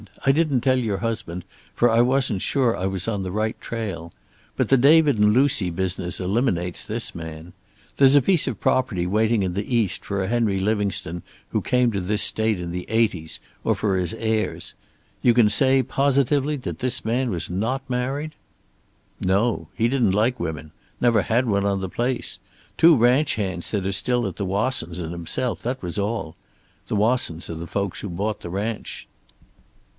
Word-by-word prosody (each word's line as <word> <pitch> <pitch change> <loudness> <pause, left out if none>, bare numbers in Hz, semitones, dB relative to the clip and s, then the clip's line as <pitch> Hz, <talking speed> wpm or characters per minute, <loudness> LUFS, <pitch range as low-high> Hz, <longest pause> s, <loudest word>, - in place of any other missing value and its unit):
"I 135 - +6
didn't 145 -4 +1
tell 130 0 +2
your 110 -5 -1
husband, 95 -6 -4 0.3
for 120 - +4
I 115 +1 +4
wasn't 125 -5 +1
sure 125 -5 +1
I 95 - -2
was 95 0 -3
on 105 -3 -1
the 95 -1 -4
right 110 +2 -2
trail. 95 -8 -5 0.5
But - - 0
the 135 - +5
David 145 -1 +5
and 105 0 +5
Lucy 125 -6 +3
business 90 0 -3
eliminates 90 -3 0
this - - -2
man. 80 +1 -8 0.4
There's 135 0 +6
a 145 - +7
piece 175 +3 +2
of - - -3
property 110 -9 +1
waiting 110 +3 +2
in 90 -2 -2
the 100 +6 -2
East 110 -5 +1
for 100 -1 -2
a - - -2
Henry 115 -3 +1
Livingstone 95 -4 -1 0.3
who - - -1
came 125 -1 +2
to 100 -3 -2
this 105 +4 0
state 110 -3 0
in 85 -1 -5
the 90 +1 -5
80's, 105 -8 0 0.2
or - - +2
for 100 -3 0
his 90 +4 -1
heirs. 110 -1 -2 0.5
You 120 -2 +4
can 110 -4 +5
say 135 +3 +4
positively 140 +2 +1
that 130 - -6
this 125 -3 -1
man 120 +3 0
was 90 -4 -2
not 115 +9 -2
married?" 135 +5 -2 0.9
"No. 95 -2 0
He 115 +3 +2
didn't 120 -6 +2
like 115 +5 +1
women. 80 -2 -5 0.3
Never 120 -3 +3
had 120 +5 +1
one 100 -2 +1
on 100 -1 +1
the 95 -1 -4
place. 120 +5 -3 0.4
Two 165 0 +6
ranch 125 +4 +3
hands 95 -5 -3
that 100 -3 -2
are 95 - 0
still 120 +5 0
at - - -5
the 100 - -2
Wassons' 95 -4 -1
and 85 -2 -5
himself, 85 +9 -2
that 125 0 -4
was 90 +3 -3
all. 100 -5 -3 0.5
The - - -2
Wassons 105 -7 0
are - - -5
the 85 +1 -6
folks 100 -1 -3
who 100 - -6
bought 100 +5 -3
the 85 - -7
ranch." 105 +5 -4
110 Hz, 185 wpm, -23 LUFS, 95-125 Hz, 0.9 s, a